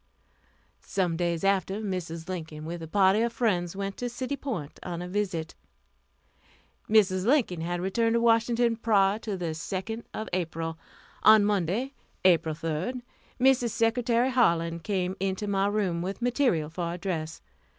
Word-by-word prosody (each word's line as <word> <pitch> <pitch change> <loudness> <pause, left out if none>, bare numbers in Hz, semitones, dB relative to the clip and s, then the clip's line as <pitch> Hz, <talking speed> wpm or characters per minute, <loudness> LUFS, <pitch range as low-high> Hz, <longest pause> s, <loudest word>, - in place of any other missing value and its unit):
Some 180 -4 0
days 170 0 -1
after, 195 0 +1
Mrs. 175 -5 -4
Lincoln, 160 -4 -6
with 170 +1 -5
a 165 - -6
party 195 +4 +4
of 235 0 +1
friends, 195 -7 0
went 195 0 -4
to 245 - -3
City 255 +3 -3
Point 215 - -5
on 175 -2 -5
a 180 - -5
visit. 180 -4 -2 1.4
Mrs. 190 -4 +4
Lincoln 225 - +2
had 175 +1 -2
returned 225 +5 +1
to - - +3
Washington 230 0 +3
prior 205 -2 +3
to 210 -4 -4
the 170 -3 -2
2d 195 +7 -4
of 220 - -5
April. 165 -2 -3 0.4
On 215 -1 +7
Monday, 205 - 0 0.3
April 165 -4 +4
3d, 165 +10 -3 0.4
Mrs. 255 -2 +4
Secretary 235 +2 +1
Harlan 170 -9 +2
came 185 +1 -2
into 195 +2 -1
my 200 -1 +1
room 200 -5 0
with 190 +3 -4
material 240 - +1
for 170 0 -3
a - - -5
dress. 170 -3 -4
195 Hz, 150 wpm, -27 LUFS, 170-225 Hz, 1.4 s, On